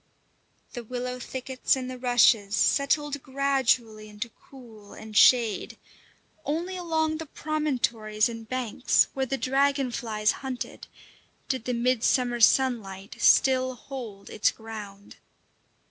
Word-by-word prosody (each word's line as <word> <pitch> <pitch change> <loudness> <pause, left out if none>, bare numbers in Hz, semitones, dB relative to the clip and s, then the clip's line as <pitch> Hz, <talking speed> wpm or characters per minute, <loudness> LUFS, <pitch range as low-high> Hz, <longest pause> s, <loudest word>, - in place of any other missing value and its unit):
The 240 - -6
willow 250 +2 -5
thickets 260 +1 -1
and 260 -1 -5
the 255 0 -7
rushes 235 -4 +3
settled 285 +2 +1
gradually 260 -6 0
into 210 +3 -6
cool 225 -5 -16
and 220 -1 -11
shade; 230 -3 +4 0.7
only 340 +6 -3
along 320 -3 -1
the 320 0 -7
promontories 245 -9 -1
and 230 -1 -8
banks, 255 -1 +1
where 265 -1 -2
the 270 - -2
dragonflies 255 -6 0
hunted, 260 -2 -6 0.6
did 260 -4 -2
the 250 - -1
mid 240 0 +1
summer 245 -2 +1
sunlight 220 -6 +1
still 260 -1 +4
hold 230 -6 -9
its 210 - +2
ground. 210 -3 -10
250 Hz, 115 wpm, -26 LUFS, 220-270 Hz, 0.7 s, shade